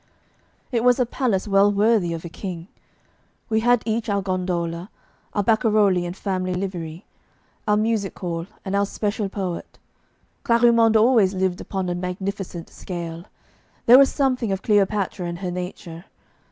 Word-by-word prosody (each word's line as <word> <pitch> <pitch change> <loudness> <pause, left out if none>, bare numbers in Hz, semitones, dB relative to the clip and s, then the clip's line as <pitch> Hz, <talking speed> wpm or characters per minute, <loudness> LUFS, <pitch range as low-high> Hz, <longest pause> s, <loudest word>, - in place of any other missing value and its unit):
It 235 -2 0
was 250 +1 +4
a 250 - +3
palace 225 -5 -1
well 200 0 +4
worthy 205 -3 +2
of 165 +1 -6
a - - -3
king. 170 0 -7 0.8
We 220 -1 +2
had 245 +1 +3
each 225 0 -1
our 200 -1 0
gondola, 180 -1 -2 0.4
our 205 - +1
barcarolli 210 -4 +3
in 175 - -4
family 185 -2 -2
livery, 180 -2 -5 0.6
our 210 0 +3
music 215 -2 -1
hall, 170 -1 -4 0.2
and 195 0 -2
our 200 0 +2
special 205 0 -2
poet. 190 -3 -5 0.7
Clarimonde 235 -1 +4
always 215 -4 +4
lived 185 -1 -1
upon 190 -2 -3
a 175 - -1
magnificent 180 -1 -4
scale; 170 -1 -6 0.6
there 245 +3 +9
was 275 - +5
something 255 -6 0
of 195 0 -2
Cleopatra 200 -3 +1
in 170 - -4
her 180 0 -4
nature. 175 -1 -7
195 Hz, 150 wpm, -23 LUFS, 180-220 Hz, 0.8 s, there